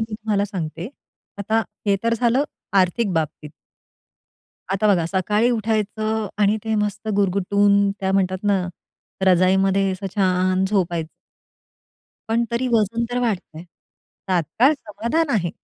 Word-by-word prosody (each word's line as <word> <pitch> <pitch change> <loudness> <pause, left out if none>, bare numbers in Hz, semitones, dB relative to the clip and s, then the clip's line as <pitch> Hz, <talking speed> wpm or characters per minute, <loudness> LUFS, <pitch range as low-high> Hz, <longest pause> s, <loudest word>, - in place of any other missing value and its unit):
मी 225 -1 -3
तुम्हाला 210 -2 -1
सांगते. 175 -2 -5 0.5
आता 220 +3 +1 0.3
हे 200 -1 +3
तर 230 0 +2
झालं 245 +4 +3 0.3
आर्थिक 190 +2 +1
बाबतीत. 155 -2 -3 1.2
आता 195 +2 +1
बघा 180 -5 +3
सकाळी 210 +6 +1
उठायचं 220 -1 -1
आणि 205 +1 +3
ते 220 0 -1
मस्त 210 +1 -2
गुरगुटून 200 +1 +2
काय 190 -1 0
म्हणतात 185 -1 +1
ना, 200 -3 +1 0.6
रजाईमध्ये 190 +1 +3
असं 190 +1 -5
छान 185 -1 +2
झोपायचं. 170 -5 0 1.2
पण 230 +1 +2
तरी 240 +2 -1
वजन 230 0 +1
तर 245 - -1
वाढतंय. 185 -8 -3 0.7
तात्काळ 190 - +3
समाधान 270 +7 -2
आहे. 175 -5 0
200 Hz, 125 wpm, -22 LUFS, 185-220 Hz, 1.2 s, हे